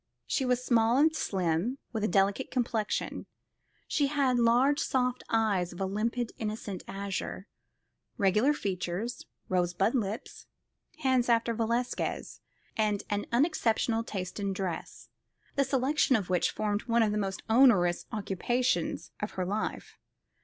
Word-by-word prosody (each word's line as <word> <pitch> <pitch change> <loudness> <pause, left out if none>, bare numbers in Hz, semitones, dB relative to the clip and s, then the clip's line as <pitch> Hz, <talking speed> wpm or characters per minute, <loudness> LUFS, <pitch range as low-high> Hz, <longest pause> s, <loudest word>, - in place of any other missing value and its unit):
She 270 - 0
was 250 0 +1
small 230 0 +3
and 315 +3 +4
slim, 185 - 0 0.2
with 220 -2 -2
a - - +3
delicate 195 +6 +1
complexion. 230 -4 -2 0.6
She 285 -2 +2
had 270 -4 +2
large 245 +5 +4
soft 250 -1 0
eyes 205 -6 +1
of 175 - -10
a 195 - 0
limpid 225 +4 -1
innocent 210 -3 -4
azure, 195 -1 -4 0.7
regular 210 +6 +3
features, 195 -1 -3 0.2
rosebud 180 +3 +1
lips, 220 -4 -3 0.6
hands 255 -2 +3
after 230 0 +3
Velasquez, 235 +2 -2 0.3
and 210 -2 +1
an 205 0 -1
unexceptionable 235 -4 +2
taste 185 -3 -5
in 200 -1 -1
dress, 185 -3 -5 0.5
the 275 - +3
selection 270 +1 +2
of 195 -5 -1
which 180 - +2
formed 210 0 -2
one 230 -1 +4
of 215 - +1
the 210 - -1
most 195 -2 -3
onerous 220 -8 +4
occupations 220 +5 -1
of 210 - -4
her 185 - -2
life. 205 +4 -4
220 Hz, 135 wpm, -29 LUFS, 195-250 Hz, 0.7 s, and